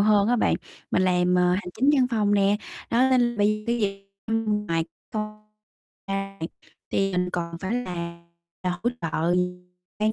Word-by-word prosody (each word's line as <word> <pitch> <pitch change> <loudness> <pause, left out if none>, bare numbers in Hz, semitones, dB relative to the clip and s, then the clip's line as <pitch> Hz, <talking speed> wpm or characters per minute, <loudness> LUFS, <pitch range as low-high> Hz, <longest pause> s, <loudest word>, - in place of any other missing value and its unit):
hơn 210 0 +5
á 245 - +4
bạn, - - +3 0.4
mình 185 - +3
làm, 180 -1 +3
ờ, 180 0 +4
hành 180 0 0
chính 275 +3 +6
văn 260 -3 +4
phòng 210 -3 +2
nè, 200 0 +4 0.3
đó 250 +3 +4
nên 240 -2 +3
bây 205 0 +4
giờ 215 - -12
cái 235 0 +1
gì 195 -1 -1 0.2
cũng 215 -2 0
mà 165 -2 +1 0.3
con 215 -1 -3 0.7
ra 195 0 -3
thì 165 - -1 0.4
thì 195 0 +2
mình 180 -1 0
còn 170 -1 -3
phải 195 +3 -2
làm 175 -8 -3 1.8
để 215 - +1
hỗ 215 - +4
205 Hz, 170 wpm, -25 LUFS, 180-220 Hz, 1.8 s, chính